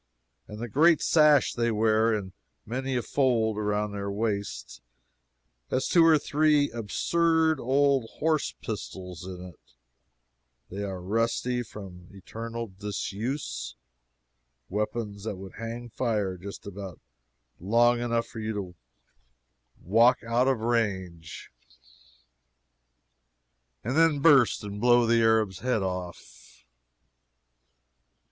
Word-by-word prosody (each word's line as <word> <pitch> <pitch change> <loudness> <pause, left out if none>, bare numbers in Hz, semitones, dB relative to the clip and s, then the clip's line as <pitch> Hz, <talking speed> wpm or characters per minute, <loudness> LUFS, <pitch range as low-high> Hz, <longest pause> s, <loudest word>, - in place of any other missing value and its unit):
And 105 - -9
the 120 +2 -5
great 155 +7 +4
sash 150 -4 +4
they 120 0 0
wear 110 +1 +2
in 100 -4 -3 0.3
many 130 +3 -3
a 120 - 0
fold 120 -6 +1
around 105 0 -1
their 100 0 -4
waists 100 - -3 0.9
has 130 - 0
two 170 - +5
or 165 -1 +6
three 150 0 +2
absurd 160 - +1
old 135 -2 +2
horse 155 -1 0
pistols 90 - -6
in 90 -1 -7
it 90 -4 -16 1.0
that 100 +2 -4
are 95 -2 -5
rusty 115 +4 0
from 95 -6 -10
eternal 115 +4 -6
disuse 100 - -5 0.9
weapons 105 0 -3
that 110 - -3
would 95 0 -10
hang 115 +1 -6
fire 105 -6 -1
just 100 +3 -9
about 100 -3 -8 0.6
long 120 +6 +3
enough 115 -1 0
for 110 - -10
you 110 0 -3
to 95 -4 -6 1.1
walk 115 +9 +4
out 120 +3 +1
of 130 -4 +1
range, 95 -8 -2 2.3
and 125 +5 -2
then 165 -2 +4
burst 140 -7 +4
and 105 0 -6
blow 120 0 +5
the 115 0 +3
Arab's 110 -4 +2
head 125 -5 0
off. 90 -2 -7
110 Hz, 115 wpm, -27 LUFS, 100-125 Hz, 2.3 s, or